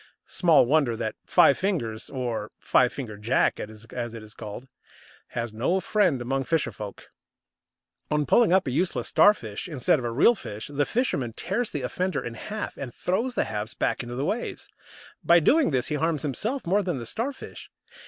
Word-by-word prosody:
Small 165 -7 +4
wonder 135 -4 +2
that 110 -1 -2
Five 140 - +5
fingers, 120 - -2
or 120 -5 -3
Five 125 -1 +3
fingered 110 -7 -7
Jack, 115 +4 +2
as 115 +2 -6
it 110 - -8
is 105 0 -13
called, 110 +5 -8 0.7
has 115 -2 -2
no 135 +12 +1
friend 195 -9 +2
among 135 +2 -1
fisher 160 -7 0
folk. 105 -1 -9 1.0
On 150 -1 +1
pulling 225 - +4
up 190 +1 +4
a 130 - -2
useless 170 +7 0
Starfish 115 - +3
instead 145 -1 +2
of 125 - -5
a - - 0
real 145 - +5
fish, 110 - -7
the 145 +1 +1
fisherman 140 - -1
tears 240 - -2
the 145 - -3
offender 185 +9 -2
in 120 - -5
half 210 - -6
and 130 -3 -6
throws 230 - -1
the - - +2
halves 105 +1 -4
back - - 0
into 120 0 -6
the 135 +3 -1
waves. 225 +8 -3 0.6
By 170 0 +6
doing 300 - +4
this 130 -3 0
he 150 - 0
harms 160 -2 0
himself 220 - -2
more 195 +4 +2
than 175 -6 -2
the 120 - -6
Starfish! 255 - -5
135 Hz, 185 wpm, -26 LUFS, 115-185 Hz, 1.0 s, By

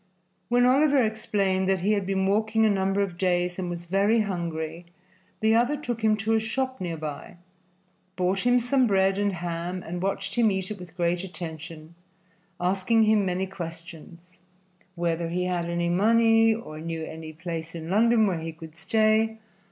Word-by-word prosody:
When 245 +1 +4
Oliver 280 +2 +4
explained 195 -3 0
that 190 -2 +1
he 200 +4 +1
had 200 -3 0
been 190 -1 0
walking 220 +2 +2
a 215 - +4
number 195 0 +1
of 180 -3 -6
days 180 -1 0
and 180 -1 -3
was 175 0 -6
very 200 +5 +2
hungry, 170 -4 -4 0.5
the 220 0 +3
other 245 +6 +2
took 240 -6 -5
him 215 -1 +3
to 220 +2 0
a 220 - +4
shop 260 +3 -3
near 170 -2 -3
by, 150 +1 -7 0.8
bought 185 +1 0
him 245 +4 +3
some 250 +1 +2
bread 195 -1 +2
and 205 0 +1
ham, 175 +1 -4
and 175 +1 -5
watched 195 +1 -2
him 235 -2 +3
eat 190 0 -2
it 205 - -6
with 180 -1 -12
great 175 +1 0
attention, 160 -2 -8 0.7
asking 190 +5 +2
him 215 -2 +3
many 185 +1 -1
questions 170 -1 -10 0.6
whether 170 -1 -1
he 180 +2 -1
had 180 -1 -1
any 170 0 -1
money 225 +4 +4
or 220 -9 -5
knew 165 0 -4
any 160 0 -8
place 165 0 -6
in 165 +1 -6
London 225 +2 +4
where 185 -5 0
he 165 0 -5
could 160 0 -12
stay. 220 +4 +2
190 Hz, 175 wpm, -26 LUFS, 170-220 Hz, 0.8 s, When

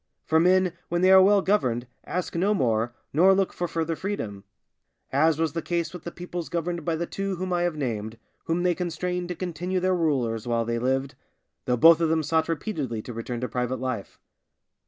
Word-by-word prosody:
For 160 - +3
men, 180 +1 +3 0.2
when 175 +1 0
they 185 - +6
are 190 0 +9
well 200 +1 +5
governed, 125 - +1 0.2
ask 180 -1 -3
no 195 +5 +2
more, 115 - +1 0.2
nor 185 +6 +6
look 195 -1 0
for 175 - -2
further 165 0 -2
freedom; 125 - -4 0.7
as 155 +3 +3
was 160 -2 0
the 165 - -2
case 170 +1 -2
with 180 - -9
the 170 - -4
peoples 175 -1 -6
governed 170 0 -2
by 165 -2 0
the 170 +2 -2
two 195 +2 -3
whom 185 +1 -3
I 175 - +1
have 175 -2 0
named, 115 -6 -3 0.3
whom 170 +2 0
they 180 -1 +3
constrained 180 +1 -3
to 180 - -4
continue 180 +1 -2
their 185 +1 +1
rulers 125 -9 0
while 115 -1 +1
they 115 0 -1
lived, 135 +2 0 0.5
though 125 - +1
both 165 +5 +7
of 165 - +2
them 160 0 +1
sought 160 +2 +1
repeatedly 150 - -3
to 120 - -7
return 115 +1 -5
to 125 - -1
private 125 0 -2
life. 125 -6 -4
165 Hz, 205 wpm, -26 LUFS, 130-180 Hz, 0.7 s, are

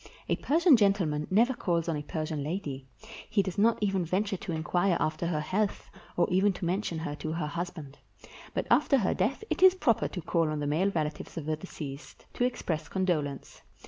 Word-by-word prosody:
A - - +3
Persian 325 0 +5
gentleman 185 -8 +1
never 230 +7 +4
calls 170 -7 -1
on 165 - 0
a 150 - -3
Persian 155 -1 -3
lady; 145 -5 -4 0.4
he 210 -2 +2
does 190 0 -4
not 225 +2 +4
even 195 -3 +1
venture 195 +5 0
to 175 - -6
inquire 175 +3 +1
after 155 +2 -1
her 155 -3 -1
health, 200 +6 -2 0.3
or 175 - +3
even 190 +2 +3
to 180 - -5
mention 180 -1 -1
her 160 -2 -4
to 155 +1 -4
her 165 -2 -2
husband. 155 -3 -6 0.6
But - - 0
after 275 - +5
her 205 -7 +1
death 270 - -1
it - - -1
is 375 0 +8
proper 230 - +2
to 180 - -6
call 165 -2 +1
on 155 -1 -2
the 145 - -2
male 160 +7 +2
relatives 155 -2 -3
of 155 - -4
the 155 0 0
deceased, 150 -4 -9
to - - -1
express 165 -11 -1
condolence. 160 -8 -2
175 Hz, 200 wpm, -29 LUFS, 155-200 Hz, 0.6 s, is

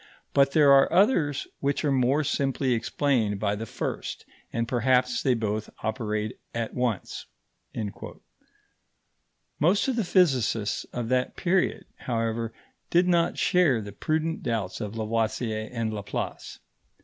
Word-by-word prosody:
But 140 0 +4
there 145 -3 +6
are 135 0 +6
others 170 - +3
which 140 +2 0
are 145 - +2
more 135 +3 +2
simply 135 -2 0
explained 115 -3 0
by 100 -1 0
the 110 +2 -6
first, - - -4 0.3
and 115 0 -1
perhaps 125 +1 +2
they 130 -2 +2
both 110 -1 -2
operate 110 -1 -2 0.2
at 115 -1 -2
once." 120 -6 -2 2.3
Most 180 - +3
of 265 - 0
the 225 - +2
physicists 130 - +2
of 120 -2 -5
that 125 0 0
period, 185 0 0
however, 115 -1 -2 0.4
did 175 +1 +3
not 170 -2 +2
share 175 - +3
the 100 -1 -7
prudent 155 - -1
doubts 110 -7 -2
of 105 +1 -5
Lavoisier 110 0 -1
and 115 -3 -2
Laplace. 100 -2 -5
125 Hz, 130 wpm, -26 LUFS, 110-145 Hz, 2.3 s, there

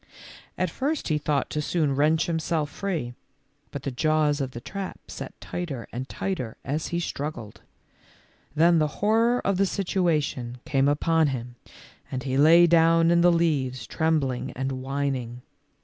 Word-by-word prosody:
At 185 -2 0
first 285 - -2
he 150 -1 +1
thought 145 -1 -1
to 150 - -1
soon 150 -3 0
wrench 155 +3 +3
himself 160 -3 -1
free, 165 -12 -3 0.6
but 140 -2 -7
the 140 - -2
jaws 150 +2 +1
of 135 - -2
the 120 - -8
trap 195 +9 -6
set - - -8
tighter 155 -9 -5
and 130 +3 -5
tighter 150 - -4
as 150 +3 -2
he 170 - -2
struggled. 145 -9 -5 0.9
Then 165 +2 +5
the 155 - +2 0.2
horror 230 +3 +3
of 195 -1 +1
the 195 +1 +3
situation 155 -11 -1
came 135 -1 +2
upon 160 +2 +2
him 125 -3 -4 0.6
and 130 -1 -3
he 130 -1 -2
lay 160 +5 +7
down 165 0 +4
in 170 0 +4
the 175 0 +6
leaves 140 -7 0
trembling 155 -6 0
and 135 +1 -2
whining. 130 -2 -3
155 Hz, 155 wpm, -25 LUFS, 135-170 Hz, 0.9 s, lay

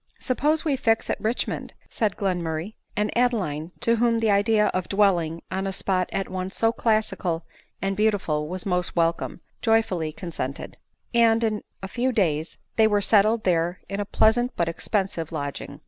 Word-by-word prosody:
" - - -35
Suppose 300 +5 0
we 295 -3 +2
fix 225 -4 +1
at - - -3
Richmond 225 +3 -2
?" - - -33
said 215 -5 -1
Glenmurray; 175 -1 -2 0.2
and 210 0 0
Adeline, 190 -11 0
to 235 -1 +3
whom 230 0 +2
the 225 -2 +2
idea 210 +1 +3
of 185 -1 -3
dwelling 175 -5 +2
on 190 +1 -1
a - - -1
spot 185 -1 0
at 195 - -2
once 185 +1 -5
so 225 0 +3
classical 215 -8 0 0.4
and 195 0 0
beautiful 190 -8 +1
was 185 +2 -5
most 180 -2 0
welcome, 165 +1 0 0.2
joy 225 -1 +4
fully 165 -7 -3
consented; 155 -5 -5 0.4
and 230 -1 +4
in 215 -2 0 0.2
a - - -3
few 245 +6 0
days 165 -8 0 0.2
they 220 -1 +6
were 210 -1 +2
settled 215 +2 +3
there 175 0 +1
in 195 - -4
a 205 - -1
pleasant 240 +5 +2
but 170 - 0
expensive 170 -1 -1
lodging. 145 -3 -5
200 Hz, 180 wpm, -25 LUFS, 170-225 Hz, 0.4 s, they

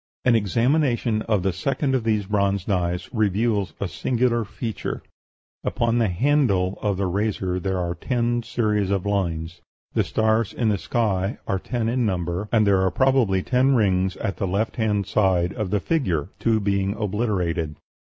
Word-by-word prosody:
An 125 -2 +5
examination 120 - +1
of 105 -5 +2
the 95 -1 +1
second 135 - -1
of 130 -3 +1
these 105 -3 +1
bronze 100 -1 0
knives 90 -3 -1
reveals 105 -4 0
a 100 - -1
singular 120 - 0
feature: 110 +2 -5 0.6
Upon 115 0 +1
the 115 - +3
handle 100 -3 +1
of 100 -3 0
the 100 - 0
razor 95 -1 -1
there 95 0 -1
are 85 -1 -1
ten 120 +5 -1
series 105 -4 0
of 100 -1 0
lines; 85 -5 -2 0.3
the - - +2
stars 110 -1 +1
in 115 -3 0
the 100 -3 0
sky 100 -3 0
are 95 - 0
ten 120 +2 -2
in 125 +2 +1
number; 90 0 -2
and 110 -2 +4
there 100 -1 +4
were 95 0 +3
probably 115 -4 +2
ten 130 +2 +3
rings 95 -4 +1
at 100 -3 -3
the 100 - -1
left 100 +5 -1
hand 105 -3 +1
side 95 -4 +1
of 105 -6 -3
the 105 - +1
figure, 95 - -1
two 115 -1 +2
being 100 0 0
obliterated. 95 -7 -1
105 Hz, 170 wpm, -23 LUFS, 95-115 Hz, 0.6 s, An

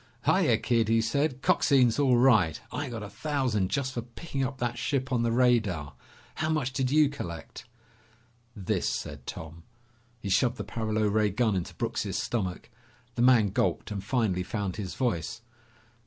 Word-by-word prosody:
"Hiya, - - +4
Kid," 115 -2 +1
he 115 +1 +3
said. 130 +4 0
"Coxine's 130 -4 +3
all 130 -4 +4
right. 110 - +4
I 145 -2 -3
got 115 -3 -5
a - - -6
thousand 115 -4 -1
just 130 -2 -1
for 120 - -3
picking 135 +4 -5
up 130 +1 -3
that 120 -1 -2
ship 130 0 -1
on 120 - +2
the 115 0 +1
radar. 110 - +2 0.4
How 155 - -2
much 150 -5 0
did 130 -1 0
you 150 +1 +5
collect?" 105 - -7 0.9
"This," 95 -4 -1
said 75 -3 -5
Tom. 80 +1 -7 0.6
He 100 - -5
shoved 120 +5 +2
the - - -4
paralo 110 -1 -1
ray 105 0 +2
gun 110 +1 +1
into 90 - -4
Brooks' - - -2
stomach. 100 -1 -3 0.4
The 120 - -2
man 120 -4 +5
gulped - - -1
and 100 -2 -4
finally 105 -5 0
found 100 0 -3
his 95 -4 -5
voice. 115 -3 -2
115 Hz, 170 wpm, -28 LUFS, 100-130 Hz, 0.9 s, you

